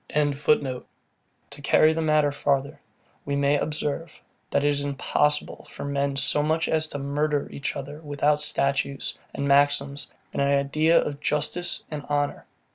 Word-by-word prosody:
] - - -42
To 145 -3 +1 0.8
carry 155 +2 +4
the 165 - -1
matter 155 -2 +3
farther, 140 +1 -1 0.4
we 140 - -2
may 140 +1 +2
observe, 150 +1 -3 0.3
that 145 - +1
it - - +4
is 145 -1 0
impossible 145 +1 0
for - - -7
men 140 0 -1
so 145 +2 +1
much 160 +2 +1
as 155 0 +1
to 145 - -5
murder 145 +1 -1
each 140 - -4
other 145 +2 -7
without 145 0 +1
statutes, 140 -1 0 0.2
and 140 - -3
maxims, 140 0 +2 0.2
and - - -1
an 140 - +3
idea 140 +4 +3
of 145 -1 -3
justice 150 +4 -1
and 150 -2 -4
honour. 145 0 -1
145 Hz, 155 wpm, -25 LUFS, 140-150 Hz, 0.8 s, carry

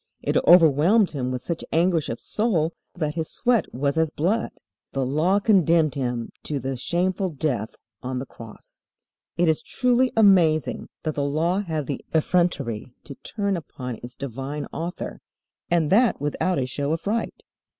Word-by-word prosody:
It - - -1
overwhelmed 175 +5 +6
him 130 -4 -3
with 125 -1 -4
such 170 -1 -3
anguish 165 -1 +2
of 115 - -4
soul 175 -8 0 0.2
that 155 -4 -2
His 160 -1 -3
sweat 240 -6 +1
was 140 +4 -1
as 160 -1 +2
blood. 185 +10 0 0.4
The 135 -1 0
Law 155 +9 +2
condemned 170 - +3
Him 120 -4 -3
to 145 -2 -3
the 135 +1 -3
shameful 180 - -1
death 135 -8 -2 0.3
on 130 0 -4
the 130 - -3
Cross. 115 -4 -13 0.5
It 175 0 +3
is 160 -1 +2
truly 250 0 +1
amazing 180 -8 +4
that 155 - -1
the 145 - -1
Law 160 +6 +1
had 160 -6 -3
the 140 - -4
effrontery 145 -9 0
to 140 - -9
turn 200 +6 -3
upon 125 -7 -6
its 125 +1 -8
divine 140 +3 -5
Author, 170 +2 -5 0.5
and 165 -3 +2
that 230 +4 +4
without 150 +5 -1
a 130 - 0
show 140 +4 -2
of 165 - -4
right. 220 +3 -2
155 Hz, 160 wpm, -24 LUFS, 135-180 Hz, 0.5 s, overwhelmed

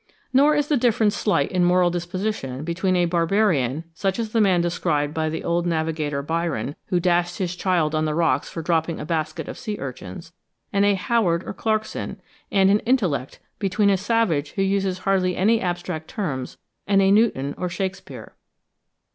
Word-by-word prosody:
Nor 290 +3 +5
is 295 -1 +1
the 295 - +2
difference 225 -3 +2
slight 205 0 +1
in 180 -1 +2
moral 180 0 +4
disposition 175 -6 -3
between 185 +3 0
a 175 -1 +3
barbarian, 165 - +1
such 190 +3 -1
as 225 -2 -3
the 225 - +2
man 190 -4 +4
described 165 -4 0
by 160 0 -1
the 160 - -4
old 170 +1 0
navigator 160 -3 -1
Byron, 160 -5 -2
who 180 - +1
dashed 175 0 +1
his 180 -2 -2
child 175 -4 +1
on 155 0 +1
the 155 -1 -1
rocks 165 0 +1
for 165 - -6
dropping 165 0 0
a - - -5
basket 160 0 -2
of - - -7
sea 215 -4 -4
urchins, 130 - -8 0.4
and 200 0 +3
a 205 -1 +4
Howard 190 -4 +1
or - - -6
Clarkson; 220 +1 -2 0.3
and 195 -1 +4
in 205 - +4
intellect, 190 - 0 0.2
between 200 +1 +2
a - - +4
savage 190 -8 0
who 195 - 0
uses 195 -1 0
hardly 185 -1 0
any 220 +5 +3
abstract 175 -3 -3
terms, 140 - -4 0.3
and 195 -1 +4
a 195 0 +4
Newton 200 -11 +2
or 180 - -3
Shakspeare. 190 +2 -5
180 Hz, 180 wpm, -23 LUFS, 160-200 Hz, 0.4 s, Nor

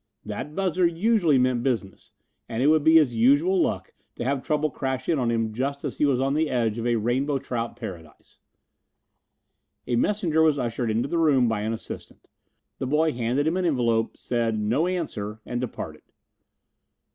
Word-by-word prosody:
That 130 +8 -6
buzzer 185 -2 +2
usually 170 - +2
meant 125 -1 +2
business, 115 -7 -3 0.4
and 115 +2 -1
it 145 - +5
would 155 -1 +4
be 160 +2 +5
his 150 -7 +5
usual 145 +11 +3
luck - - -2 0.2
to - - -4
have 135 +2 -1
trouble 155 0 0
crash 130 -1 -3
in 160 -4 +1
on 120 -2 0
him 115 -2 -1
just 140 +4 -3
as - - -5
he - - +4
was 130 -3 +1
on 135 +1 +1
the 155 +1 +1
edge 115 -3 0
of 115 - -2
a 120 - +2
rainbow 130 +6 0
trout 120 -3 -4
paradise. 80 -4 -10 1.5
A 120 - -1
messenger 170 - +1
was 155 -2 +4
ushered 120 -2 -2
into 115 +4 0
the 170 - -1
room 140 -6 +4
by 110 -2 -1
an 110 +1 -2
assistant. 115 - -9 0.5
The 130 - -2
boy 155 +3 +2
handed 125 +3 -1
him 165 +3 +1
an 185 - 0
envelope, 115 -7 +1
said, 115 -2 -1
"No 115 +11 +1
answer," 110 - -4
and 120 0 -3
departed. 125 - -6
130 Hz, 180 wpm, -25 LUFS, 115-155 Hz, 1.5 s, it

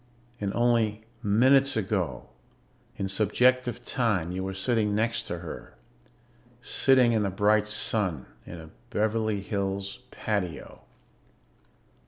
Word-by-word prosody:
And 100 -1 -2
only 115 -3 +1 0.2
minutes 130 +5 +4
ago, 95 - -2 0.7
in 95 - -2
subjective 120 +5 +1
time, 105 -9 0
you 95 +1 -3
were 95 0 -4
sitting 105 +1 +1
next 115 +1 0
to 85 - -3
her, 85 - -9 0.8
sitting 130 0 +3
in 110 - +2
the 100 - 0
bright 105 +2 +2
sun 105 - 0 0.2
in 85 - -9
a 80 0 -12 0.2
Beverly 110 -1 0
Hills 100 +1 -3
patio 100 -8 -4
105 Hz, 115 wpm, -27 LUFS, 95-115 Hz, 0.8 s, minutes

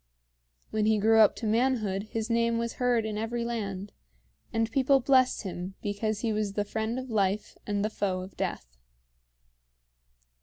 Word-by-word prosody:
When 215 -1 +1
he 220 0 +4
grew 220 +2 +4
up 215 -2 +6
to 230 - -6
manhood 220 -3 +1
his 225 -1 -2
name 230 0 +2
was 235 0 -3
heard 245 -3 +2
in 215 -1 -3
every 235 +1 -2
land, 205 -4 -4 0.6
and 225 0 0
people 270 +2 +4
blessed 260 -1 +3
him 185 0 -5
because 210 +1 -2
he 225 -2 0
was 210 -2 -1
the 205 0 -1
friend 220 +3 -2
of 260 -1 -5
life 200 -1 0
and 205 0 0
the - - 0
foe 190 -3 -1
of 185 +1 -10
death. - - -4
220 Hz, 165 wpm, -28 LUFS, 205-235 Hz, 0.6 s, up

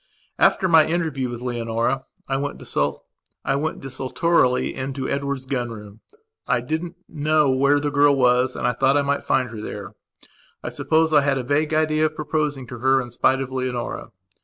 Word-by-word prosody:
After 190 - +4
my 160 -3 +6
interview 160 -6 -1
with 120 0 -6
Leonora 120 +2 -1 0.2
I 135 - -1
went 145 +1 -3
desultorily 135 - -1
into 130 0 -4
Edward's 140 -1 -2
gun 125 -3 -2
room. 105 -2 -10 0.5
I 120 - +2
didn't 160 +7 -4
know 150 -2 +2
where 140 +2 +3
the 145 0 -2
girl 145 0 +4
was 125 0 +3
and - - -3
I 125 - +2
thought 135 +3 +2
I 145 - +2
might 140 0 -1
find 130 -3 +1
her 110 -2 -7
there. 105 -1 -7 0.7
I - - -3
suppose 160 0 +1
I 150 - +6
had 140 -1 +1
a 130 - -2
vague 150 +4 0
idea 155 0 +2
of 155 - -9
proposing 150 -3 -2
to 120 - -7
her 135 +2 +3
in 120 -2 -5
spite 130 +3 +2
of 130 -1 -5
Leonora. 130 -2 -3
135 Hz, 175 wpm, -22 LUFS, 125-150 Hz, 0.7 s, my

